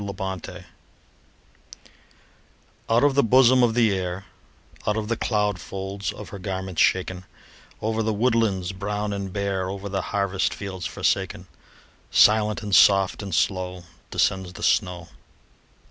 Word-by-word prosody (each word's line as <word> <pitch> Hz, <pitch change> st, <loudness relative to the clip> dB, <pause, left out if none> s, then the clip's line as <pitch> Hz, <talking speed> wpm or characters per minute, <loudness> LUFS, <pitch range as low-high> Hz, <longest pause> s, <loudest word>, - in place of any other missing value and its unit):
SNOW 100 Hz, -1 st, -5 dB
FLAKES 95 Hz, -1 st, -6 dB, 2.3 s
Out 115 Hz, +4 st, +3 dB
of 145 Hz, -1 st, +4 dB
the 140 Hz, -, +4 dB
bosom 130 Hz, +1 st, +5 dB
of 115 Hz, -2 st, +2 dB
the 115 Hz, -4 st, +3 dB
Air, 90 Hz, 0 st, -4 dB, 0.6 s
Out 105 Hz, -, +1 dB
of 105 Hz, 0 st, -3 dB
the 115 Hz, -, +1 dB
cloud 105 Hz, -4 st, 0 dB
folds 100 Hz, +2 st, -5 dB
of -, -, -10 dB
her 100 Hz, -, -8 dB
garments 95 Hz, -2 st, -3 dB
shaken, 95 Hz, 0 st, +1 dB, 0.6 s
Over 110 Hz, +1 st, 0 dB
the 110 Hz, 0 st, 0 dB
woodlands 110 Hz, -5 st, +1 dB
brown 105 Hz, +2 st, -3 dB
and 100 Hz, -1 st, -4 dB
bare, 95 Hz, -2 st, -2 dB
Over 100 Hz, +1 st, -5 dB
the 95 Hz, 0 st, -1 dB
harvest 100 Hz, -1 st, -1 dB
fields 95 Hz, -3 st, -5 dB
forsaken, -, -, -1 dB, 0.6 s
Silent, 105 Hz, +1 st, +4 dB
and 105 Hz, -1 st, -4 dB
soft, 95 Hz, 0 st, +5 dB
and 100 Hz, -5 st, -4 dB
slow 90 Hz, -1 st, -1 dB, 0.3 s
Descends 95 Hz, -2 st, 0 dB
the -, -, -9 dB
snow. 90 Hz, -4 st, 0 dB
100 Hz, 140 wpm, -24 LUFS, 95-110 Hz, 2.3 s, bosom